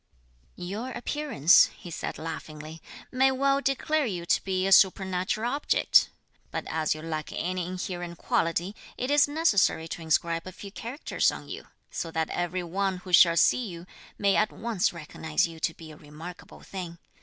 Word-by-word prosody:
"Your 205 +8 -5
appearance," 245 - +4
he 175 - -10
said - - -5
laughingly, 155 -1 -7 0.3
"may 265 +1 +4
well 275 +1 +2
declare 280 +2 0
you 175 -5 -4
to - - +2
be 190 -1 -1
a 195 - 0
supernatural 190 +4 +3
object, 290 +1 +3 0.4
but - - -4
as 155 -1 0
you 155 - -9
lack 155 -2 -4
any 180 0 -2
inherent 175 -1 -5
quality 170 +6 0 0.2
it 255 +3 -2
is 290 -1 +5
necessary 285 - +2
to 170 - -6
inscribe 165 +1 0
a - - -6
few 200 +2 -10
characters 240 +8 -1
on - - -7
you, - - -7 0.3
so 165 - -4
that 160 -1 -2
every 175 +1 -2
one 190 +2 -1
who 180 0 -10
shall 170 -1 +7
see 250 - +4
you 170 -2 -8 0.3
may 200 -1 +2
at 215 - +2
once 225 -5 -1
recognise 160 +1 -1
you 165 -1 -11
to 165 - 0
be 160 -1 -11
a 150 - -13
remarkable 160 +4 -11
thing. 180 -3 -7
180 Hz, 170 wpm, -27 LUFS, 165-215 Hz, 0.4 s, shall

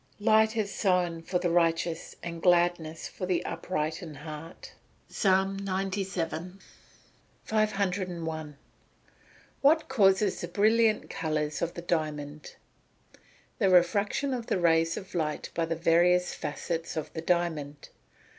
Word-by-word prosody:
[Verse: 205 - -11
"Light 220 0 +4
is 205 -2 -1
sown 180 -4 +1
for 180 +2 -1
the 175 -1 0
righteous, 165 -1 0
and 170 -1 -6
gladness 175 -3 +2
for 185 - -6
the 180 -2 0
upright 160 -1 -3
in 160 -4 -8
heart." 155 +3 -9 0.4
PSALM 195 0 +1
XCVII.] 190 -2 -3 0.8
501. 180 -8 -1 1.0
What 315 +3 +4
causes 200 -5 +3
the - - -3
brilliant 220 +1 +3
colours 155 -2 -2
of 170 0 -2
the 170 - -6
diamond? 155 -3 -3 1.0
The 195 -4 +3
refraction 200 +9 +3
of 240 -3 -4
the - - +1
rays 165 -1 +3
of 190 - -8
light 155 -3 -2
by 165 - 0
the 165 - -1
various 175 +2 +3
facets 165 +2 -4
of 155 - -4
the 160 - -4
diamond. 160 -5 -1
175 Hz, 125 wpm, -28 LUFS, 165-195 Hz, 1.0 s, Light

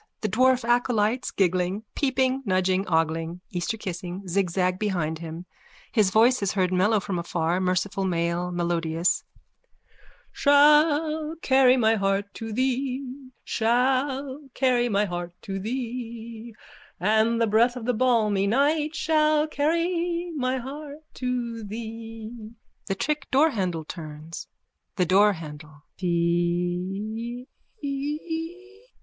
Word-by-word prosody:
The 215 - -1
dwarf 255 +3 +3
acolytes, 240 -1 +1
giggling, 185 +2 0
peeping, 265 -1 +1
nudging, 185 -2 +1
ogling, 165 +1 0
Easterkissing, 180 0 -4
zigzag 185 0 0
behind 170 -7 -1
him. 165 +1 -7 0.5
His 215 -5 +3
voice 235 +5 +4
is 200 - 0
heard 185 -2 +1
mellow 205 +4 +3
from 190 -2 -3
afar, 170 0 -1
merciful 190 +2 0
male, 170 0 -1
melodious:)_ 170 -1 0 1.1
Shall 300 +2 +4
carry 265 -1 +5
my 225 -2 +3
heart 195 0 0
to 225 0 -6
thee, 260 +2 -2
Shall 265 +4 0
carry 250 -2 +2
my 205 -1 +2
heart 175 -2 -5
to 195 -1 -4
thee, 230 0 -5 0.4
And 220 +4 +2
the 230 - +4
breath 230 +3 +3
of 245 -3 -6
the 250 - +1
balmy 215 -5 +2
night 295 +7 +2
Shall 310 -1 +3
carry 340 +3 0
my 260 -2 0
heart 290 +4 -8
to 240 -3 -3
thee! 225 +1 -8 0.3
(The 195 - -1
trick 300 +7 -2
doorhandle 195 - +1
turns.) 155 -1 -8 0.5
THE 180 - +2
DOORHANDLE: 160 -6 +1 0.2
Theeee! 180 +7 -1
220 Hz, 110 wpm, -25 LUFS, 180-255 Hz, 1.1 s, carry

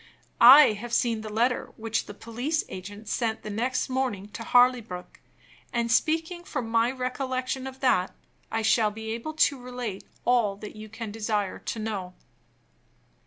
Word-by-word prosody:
I 260 +2 +10
have 230 +3 -7
seen 230 -2 +1
the 215 - -7
letter 240 +4 0
which 225 0 -2
the 205 - -9
police 245 +9 -2
agent 205 +3 -8
sent 225 0 -1
the 215 - -5
next 245 +5 -1
morning 255 -7 -2
to 210 - -8
Harleybrook; 235 -6 +2 0.5
and, 235 -1 0
speaking 325 +6 +1
from 250 -8 -4
my 230 +1 +2
recollection 255 0 -3
of 265 0 -10
that, 190 -9 +2 0.4
I 225 0 -1
shall 220 0 +4
be 220 +1 -6
able 235 +8 -4
to 285 -4 +2
relate 245 -5 -5 0.2
all 225 -5 +2
you 215 +1 -9
can 225 0 -6
desire 210 -2 -2
to - - -5
know. 200 -5 -4
230 Hz, 155 wpm, -27 LUFS, 215-255 Hz, 0.5 s, I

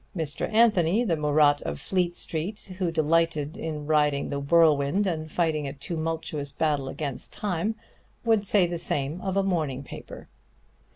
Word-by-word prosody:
Mr. 155 +2 -2
Anthony, 215 -2 +4
the 180 -8 +1
Murat 150 -1 +3
of 70 0 -4
Fleet 180 -2 0
Street, 190 +5 -4
who 180 -3 +1
delighted 160 -1 +1
in 155 -8 -5
riding 150 -2 +1
the 140 - -2
whirlwind 155 +3 +3
and 160 -4 -2
fighting 155 -4 0
a 135 - -5
tumultuous 155 -1 -3
battle 145 -3 0
against 140 -2 -4
time, 205 +2 -2 0.5
would 225 -3 +3
say 200 -2 +4
the 170 -1 -3
same 145 +3 -2
of 195 0 -2
a 195 - +3
morning 155 -8 -1
paper. - - -10
160 Hz, 155 wpm, -26 LUFS, 145-180 Hz, 0.5 s, Anthony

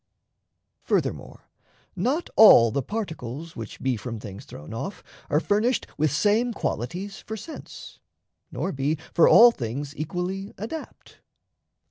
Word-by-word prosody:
Furthermore, - - -2 0.5
not 295 +7 0
all 120 - +8
The 140 - 0
particles 160 - -6
which 115 -2 -8
be 130 -1 0
from 115 +1 -6
things 100 -3 -9
thrown 75 +7 -10
off 190 - -6 0.3
Are 150 - +3
furnished 215 +8 +1
with 150 -1 +1
same 215 +8 +2
qualities 185 - -4
for 220 - -7
sense, 315 +10 -10 0.5
Nor 195 - -2
be 140 +3 -1 0.2
for 170 - +6
all 240 +1 +9
things 140 - -5
equally 180 +6 -4
adapt. 265 +10 -8
165 Hz, 125 wpm, -25 LUFS, 130-210 Hz, 0.5 s, all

